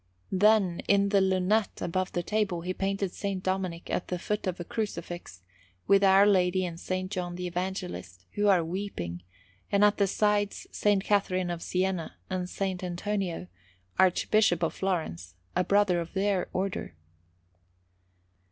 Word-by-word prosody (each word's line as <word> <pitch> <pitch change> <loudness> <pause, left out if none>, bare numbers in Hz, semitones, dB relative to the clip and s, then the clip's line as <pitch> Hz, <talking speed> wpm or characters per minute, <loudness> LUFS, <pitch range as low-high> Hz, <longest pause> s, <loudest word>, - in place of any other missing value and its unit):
Then, 195 -2 +4
in 200 0 +4
the 200 -1 +4
lunette 190 +3 +1
above 185 +2 -2
the 175 - -1
table, 200 -3 0
he 180 +2 -3
painted 195 0 -1
S. 200 0 -3
Dominic 185 -2 -2
at - - -1
the 180 - -2
foot 210 +3 -3
of 180 -1 -2
a - - -3
Crucifix, 175 - -5 0.4
with 200 0 +5
Our 195 +1 +7
Lady 185 -2 +3
and 170 -1 -6
S. 185 +1 -2
John 180 -3 -3
the 180 0 -4
Evangelist, 175 - -4
who 205 0 +1
are 185 -5 +4
weeping, 165 - -4 0.5
and 200 +1 +5
at 210 0 +3
the 200 - +3
sides 205 0 +1
S. 205 -1 +2
Catherine 185 -3 +1
of 170 -1 -4
Siena 185 -2 -1 0.2
and 185 -1 -1
S. 180 - -11
Antonino, 185 - -2 0.5
Archbishop 185 -1 +3
of 165 - +1
Florence, 95 - -3 0.2
a 180 - +3
brother 200 -1 +3
of 170 -1 -6
their 195 -1 0
Order. 190 - -3
185 Hz, 150 wpm, -28 LUFS, 175-200 Hz, 0.5 s, Our